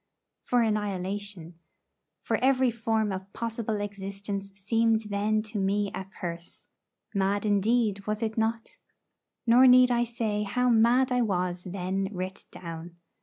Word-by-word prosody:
For 245 Hz, -1 st, +2 dB
annihilation; 200 Hz, -4 st, -3 dB, 0.6 s
for -, -, 0 dB
every 260 Hz, -1 st, +3 dB
form 220 Hz, -2 st, 0 dB
of 190 Hz, +1 st, -6 dB
possible 225 Hz, -2 st, -3 dB
existence 200 Hz, 0 st, -5 dB
seemed 225 Hz, +3 st, +1 dB
then 215 Hz, +2 st, +1 dB
to 215 Hz, -1 st, -5 dB
me 200 Hz, +1 st, 0 dB
a 190 Hz, -, -5 dB
curse. 175 Hz, -3 st, -7 dB, 0.5 s
Mad 200 Hz, +1 st, 0 dB
indeed, 210 Hz, 0 st, +1 dB
was 215 Hz, +2 st, -1 dB
it 220 Hz, -1 st, -2 dB
not? 225 Hz, 0 st, -2 dB, 0.7 s
Nor 245 Hz, +2 st, +7 dB
need 250 Hz, 0 st, +7 dB
I 240 Hz, 0 st, +2 dB
say 225 Hz, -3 st, -2 dB
how 250 Hz, +5 st, +1 dB
mad 240 Hz, +3 st, +4 dB
I 250 Hz, 0 st, +2 dB
was 180 Hz, -4 st, -1 dB
then 190 Hz, +1 st, -2 dB
writ 185 Hz, -1 st, -6 dB
down. 170 Hz, 0 st, -8 dB
210 Hz, 135 wpm, -28 LUFS, 195-230 Hz, 0.7 s, Nor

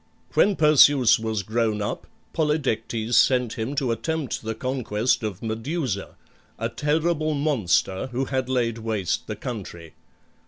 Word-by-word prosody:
When 205 Hz, -, +4 dB
Perseus 145 Hz, -6 st, +6 dB
was 110 Hz, -3 st, -2 dB
grown 110 Hz, +1 st, 0 dB
up 105 Hz, -, -4 dB, 0.3 s
Polydectes 120 Hz, -7 st, -1 dB
sent 125 Hz, -2 st, +4 dB
him 125 Hz, +4 st, -4 dB
to 130 Hz, -3 st, 0 dB
attempt 145 Hz, +5 st, -2 dB
the 110 Hz, 0 st, -4 dB
conquest 125 Hz, -1 st, -1 dB
of 105 Hz, -2 st, -5 dB
Medusa, 115 Hz, -, -3 dB, 0.4 s
a -, -, -2 dB
terrible 155 Hz, +1 st, 0 dB
monster 110 Hz, -, +1 dB
who 130 Hz, +1 st, -2 dB
had 130 Hz, -2 st, -2 dB
laid 115 Hz, -3 st, 0 dB
waste 110 Hz, -5 st, -2 dB
the -, -, -4 dB
country. 90 Hz, -9 st, -7 dB
120 Hz, 130 wpm, -24 LUFS, 110-145 Hz, 0.4 s, Perseus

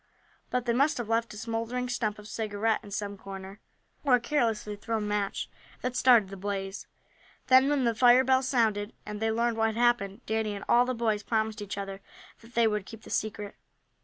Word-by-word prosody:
But 250 Hz, -1 st, -1 dB
they 235 Hz, -, +1 dB
must 280 Hz, +5 st, +2 dB
have 235 Hz, -3 st, -4 dB
left 230 Hz, 0 st, +1 dB
a -, -, -9 dB
smouldering 230 Hz, +3 st, -3 dB
stump 225 Hz, -4 st, -1 dB
of 210 Hz, 0 st, -11 dB
cigarette 215 Hz, 0 st, -1 dB
in 205 Hz, -, -11 dB
some 200 Hz, 0 st, -4 dB
corner, 195 Hz, +1 st, -9 dB, 0.4 s
or 270 Hz, -4 st, +5 dB
a -, -, +1 dB
carelessly 230 Hz, -5 st, 0 dB
thrown 215 Hz, 0 st, -2 dB
match, 205 Hz, -1 st, -1 dB, 0.4 s
that 250 Hz, 0 st, -2 dB
started 240 Hz, -7 st, +5 dB
the 195 Hz, -, -8 dB
blaze. 195 Hz, 0 st, -4 dB, 0.6 s
Then, 260 Hz, +1 st, +7 dB
when 290 Hz, -3 st, +2 dB
the 235 Hz, -1 st, +2 dB
fire 245 Hz, +2 st, +6 dB
bells 260 Hz, 0 st, +2 dB
sounded, 220 Hz, -5 st, +1 dB
and 210 Hz, -1 st, -6 dB
they 225 Hz, +1 st, +1 dB
learned 230 Hz, +1 st, 0 dB
what 225 Hz, 0 st, +3 dB
had 220 Hz, 0 st, -3 dB
happened, 240 Hz, -3 st, +1 dB
Danny 220 Hz, -1 st, -1 dB
and 200 Hz, -, -7 dB
all 240 Hz, +1 st, +5 dB
the 255 Hz, 0 st, -2 dB
boys 220 Hz, -3 st, 0 dB
promised 220 Hz, 0 st, -1 dB
each 200 Hz, -1 st, -5 dB
other 195 Hz, 0 st, -5 dB, 0.4 s
that 230 Hz, +1 st, -18 dB
they 235 Hz, 0 st, +4 dB
would 210 Hz, -3 st, 0 dB
keep 225 Hz, -1 st, -11 dB
the -, -, -11 dB
secret. 210 Hz, -1 st, -2 dB
225 Hz, 205 wpm, -28 LUFS, 205-240 Hz, 0.6 s, Then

